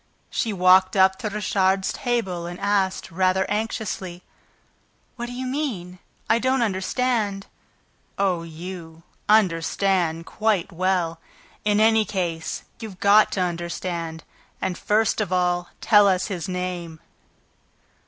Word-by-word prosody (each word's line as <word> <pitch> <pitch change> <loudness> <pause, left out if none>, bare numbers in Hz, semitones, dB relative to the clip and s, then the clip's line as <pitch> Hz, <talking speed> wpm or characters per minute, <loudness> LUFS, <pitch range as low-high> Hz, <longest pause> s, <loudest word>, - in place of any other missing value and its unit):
She 225 - -1
walked 185 0 +4
up 190 0 +4
to 215 - -3
Richard's 195 -2 +1
table 190 -8 -2
and 175 +1 -7
asked, 200 -2 0
rather 185 +2 +2
anxiously: 205 -4 -3 0.9
"What 240 -1 -5
do - - -7
you 255 +1 -5
mean? 235 - -3 0.3
I 225 - +3
don't 260 0 +2
understand." 205 0 -1 0.7
"Oh, 190 -4 +1
you, 165 0 -9 0.3
understand 180 -3 +2
quite 210 -3 0
well. 175 -2 0 0.4
In 210 0 +2
any 220 0 +5
case, 175 -5 -3 0.2
you've 215 -5 -8
got 205 +2 +5
to 190 - 0
understand... 170 -1 -3 0.4
And, 190 -1 -2
first 215 +3 +1
of 200 -4 -3
all, 180 -1 +1
tell 205 -1 +6
us 185 0 +1
his 185 -1 -4
name." 180 -3 -4
190 Hz, 125 wpm, -23 LUFS, 175-210 Hz, 0.9 s, tell